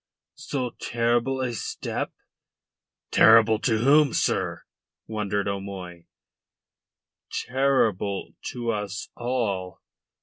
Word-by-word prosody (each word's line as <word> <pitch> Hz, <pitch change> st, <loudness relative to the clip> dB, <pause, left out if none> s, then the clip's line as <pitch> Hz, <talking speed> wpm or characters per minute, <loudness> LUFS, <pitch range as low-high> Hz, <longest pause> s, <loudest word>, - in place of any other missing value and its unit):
so 130 Hz, -4 st, -3 dB
terrible 120 Hz, +3 st, 0 dB
a 125 Hz, -2 st, -1 dB
step?" 110 Hz, -, -4 dB, 1.0 s
"Terrible 110 Hz, -1 st, +6 dB
to 110 Hz, -1 st, +1 dB
whom, 140 Hz, +4 st, +4 dB
sir?" -, -, 0 dB, 0.4 s
wondered 105 Hz, -2 st, -2 dB
O'Moy. 95 Hz, -3 st, -6 dB, 1.4 s
"Terrible 125 Hz, -7 st, +1 dB
to 120 Hz, -1 st, -2 dB
us 105 Hz, -2 st, -4 dB
all." 110 Hz, -7 st, -2 dB
110 Hz, 80 wpm, -25 LUFS, 100-125 Hz, 1.4 s, Terrible